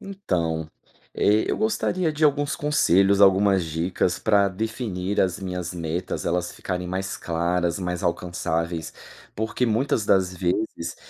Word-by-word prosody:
Então, 85 - -2 0.5
eh, 105 +1 +3
eu - - 0
gostaria 185 -6 0
de 150 +1 0
alguns 145 0 +2
conselhos, 100 - +3
algumas 95 -1 +5
dicas 85 +2 -1
pra 100 -2 +3
definir 100 -1 -2
as 90 -2 +1
minhas 90 -2 -4
metas, 85 +1 -3
elas 90 +1 -1
ficarem 90 -1 -4
mais 95 +1 -3
claras, 85 +1 -1
mais 90 0 -3
alcançáveis. 85 -2 -2 0.4
Porque 110 +4 -1
muitas 115 0 0
das 95 -2 +3
vezes 90 -2 -2
95 Hz, 130 wpm, -24 LUFS, 85-110 Hz, 0.5 s, algumas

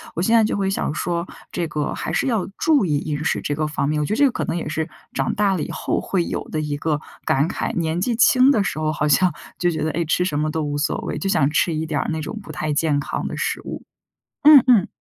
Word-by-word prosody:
我 170 - -1
现 225 +5 +3
在 225 - +6
就 215 - 0
会 195 -1 0
想 195 -6 -1
说， 170 +2 -2 0.3
这 170 - -1
个 150 -1 -2
还 160 - -4
是 220 - +1
要 220 -7 0
注 300 -9 +3
意 150 -4 +1
饮 150 -1 -3
食 - - 0
这 145 - -2
个 155 0 -1
方 150 -2 -1
面。 150 0 0
我 150 - 0
觉 - - -2
得 - - -1
这 290 - +6
个 265 - +3
可 - - -3
能 - - -2
也 170 - -4
是， 160 +1 -2 0.3
长 135 -1 -1
大 200 -2 +2
了 160 - -2
以 - - -5
后 - - -1
会 180 -3 -1
有 - - -3
的 155 - -2
一 150 -1 -2
个 150 0 -1 0.3
感 140 +3 +2
慨， - - -3
年 165 0 -1
纪 235 +4 0
轻 255 +3 +5
的 220 -7 +3
时 175 - -3
候 155 0 0
好 150 0 -1
像 175 +3 +3 0.2
就 175 -1 +1
觉 155 -2 -3
得， 155 - 0
哎， 170 +2 -1
吃 180 +3 +1
什 150 -5 -1
么 155 +1 0
都 160 0 -2
无 145 0 -2
所 145 - -1
谓， - - -4
就 195 - -2
想 150 -9 +3
吃 165 +2 +1
一 155 +1 -2
点 155 -2 -1
儿 - - -3
那 160 0 -2
种 220 - -6
不 - - -9
太 155 -1 -3
健 145 -1 +1
康 - - -4
的 - - -4
食 - - -2
物。 - - -7 0.6
嗯 295 -4 +9
嗯。 230 -7 +5
160 Hz, 310 characters per minute, -21 LUFS, 150-195 Hz, 0.6 s, 嗯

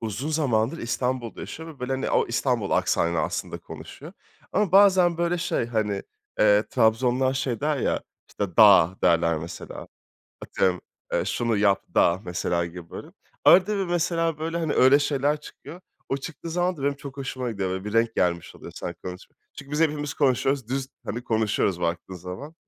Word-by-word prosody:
uzun 115 +6 -4
zamandır 135 -2 +1
İstanbul'da 120 0 -3
yaşıyor 160 +1 -8
ve 155 -4 -12
böyle, 125 +1 -2
hani, 130 +1 -2
o - - +2
İstanbul 120 -3 -1
aksanıyla 85 -2 +1
aslında - - -3
konuşuyor. - - -11 0.4
Ama 205 -4 +1
bazen 190 -3 +5
böyle 170 +1 0
şey, 165 -8 -1
hani, 105 -4 -1 0.4
eee, 105 0 +5
Trabzonlular 125 +3 +2
şey 130 -4 -2
der 150 0 0
ya, 130 - 0 0.3
işte, 100 -5 -5
"da" 100 -4 +7
derler, 85 -2 +3
mesela, 80 +2 -8 0.5
atıyorum: 90 -2 0 0.4
"Şunu 115 -2 0
yap 100 -1 +3
da!", 85 +2 +3
mesela, 85 -1 -1
gibi 85 -1 -10
böyle. - - -8 0.4
Arada 190 +3 +6
bir, 195 - 0
mesela, 165 -2 0
böyle, 165 +2 -3
hani, 160 -3 -1
öyle 130 +2 +6
şeyler 145 +1 0
çıkıyor. 165 +3 -12 0.3
O 135 - 0
çıktığı 150 +3 -8
zaman 180 +2 0
da 140 - -8
benim 140 +1 +1
çok 140 0 -10
hoşuma 130 -2 -4
gidiyor. 100 -4 -3
Böyle 95 +1 -4
bir 105 - -5
renk 115 0 +2
gelmiş 85 -1 -1
oluyor, - - -11
sanki - - -6
konuşmaya. 90 0 -9 0.2
Çünkü 140 - -10
biz 150 - 0
hepimiz 150 -2 0
konuşuyoruz, 135 -2 +1
düz, 135 +1 -2 0.2
hani, 120 +3 -5
konuşuyoruz 105 -5 0
baktığın 85 +2 -3
zaman. 90 - -8
125 Hz, 170 wpm, -25 LUFS, 100-150 Hz, 0.5 s, da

